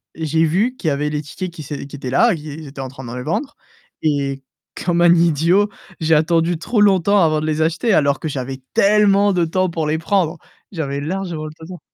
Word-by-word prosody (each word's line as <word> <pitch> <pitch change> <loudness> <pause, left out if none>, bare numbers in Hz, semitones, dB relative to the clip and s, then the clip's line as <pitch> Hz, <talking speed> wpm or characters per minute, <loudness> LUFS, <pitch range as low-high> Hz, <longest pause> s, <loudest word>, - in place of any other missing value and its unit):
j'ai 160 0 0
vu 200 +11 +1
qu'il 185 - -5
y 155 - +3
avait 150 +2 -1
les 150 0 -2
tickets 175 +5 -6
qui 165 - -10
s'ét 145 0 -6
qui 140 - -10
étaient 135 -2 -6
là, 225 - +4
ils 155 -3 -7
ils 155 - -9
étaient 135 0 -8
en 135 - -4
train 130 +1 -11
de 120 +1 -7
les 125 - -5
vendre, 270 - -3 0.5
et 140 -3 -1 0.4
comme 175 -1 +1
un 175 0 +6
idiot, 170 +5 +3 0.3
j'ai 160 0 +3
attendu 165 +2 +2
trop 215 +6 0
longtemps 200 0 +4
avant 155 -1 +2
de - - -3
les 155 0 -1
acheter 170 +8 +1
alors 140 -4 +2
que - - -4
j'avais 135 -2 -5
tellement 205 0 +4
de 175 -2 +2
temps 185 +2 0
pour 165 -2 -2
les 155 +1 0
prendre. 170 0 0 0.3
J'avais 140 -6 -3
largement 170 -1 -4
le 155 - -6
temps. 170 +2 -10
160 Hz, 225 wpm, -19 LUFS, 150-185 Hz, 0.5 s, un